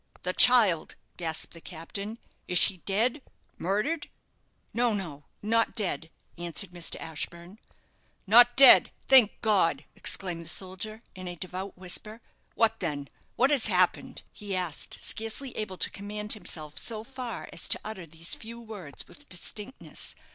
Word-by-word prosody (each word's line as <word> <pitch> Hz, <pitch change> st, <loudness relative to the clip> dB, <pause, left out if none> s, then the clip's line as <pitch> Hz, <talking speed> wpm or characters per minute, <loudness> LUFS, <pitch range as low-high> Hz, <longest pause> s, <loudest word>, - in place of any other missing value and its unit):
"The 180 Hz, -, 0 dB
child!" 215 Hz, -11 st, +5 dB, 0.2 s
gasped 160 Hz, -2 st, -2 dB
the 165 Hz, -, -10 dB
captain; 200 Hz, +7 st, -6 dB, 0.3 s
"is 180 Hz, -, +2 dB
she 190 Hz, +2 st, +6 dB
dead 225 Hz, -, 0 dB, 0.4 s
murdered?" 210 Hz, -, -1 dB, 0.6 s
"No, 235 Hz, -2 st, +2 dB
no, 155 Hz, -8 st, -6 dB, 0.2 s
not 230 Hz, +2 st, +2 dB
dead," 175 Hz, -7 st, -1 dB, 0.3 s
answered 175 Hz, +2 st, -3 dB
Mr. 175 Hz, -1 st, -2 dB
Ashburne. 170 Hz, +5 st, -6 dB, 0.7 s
"Not 240 Hz, +4 st, +7 dB
dead! 270 Hz, 0 st, +9 dB, 0.2 s
Thank 255 Hz, -6 st, +6 dB
God!" 175 Hz, -9 st, +3 dB
exclaimed 175 Hz, -3 st, -2 dB
the -, -, -8 dB
soldier, 195 Hz, +6 st, -4 dB
in 185 Hz, -1 st, -8 dB
a 175 Hz, -, -5 dB
devout 185 Hz, +3 st, -5 dB
whisper. 200 Hz, +4 st, -3 dB, 0.4 s
"What 225 Hz, -1 st, +3 dB
then? 145 Hz, -5 st, -3 dB, 0.3 s
What 265 Hz, +4 st, +3 dB
has 270 Hz, -6 st, +3 dB
happened?" 185 Hz, +7 st, +1 dB
he 205 Hz, -3 st, -5 dB
asked, 180 Hz, -4 st, -2 dB
scarcely 225 Hz, +4 st, -3 dB
able 200 Hz, -4 st, -3 dB
to -, -, +2 dB
command 210 Hz, +1 st, -2 dB
himself 155 Hz, -8 st, -6 dB
so 220 Hz, -2 st, -2 dB
far 250 Hz, -2 st, -6 dB
as -, -, -1 dB
to -, -, +3 dB
utter 190 Hz, -6 st, -6 dB
these 165 Hz, +2 st, -4 dB
few 230 Hz, +1 st, -8 dB
words 205 Hz, -11 st, -7 dB
with 290 Hz, -, -13 dB
distinctness. 210 Hz, +7 st, -3 dB
200 Hz, 145 wpm, -28 LUFS, 175-225 Hz, 0.7 s, dead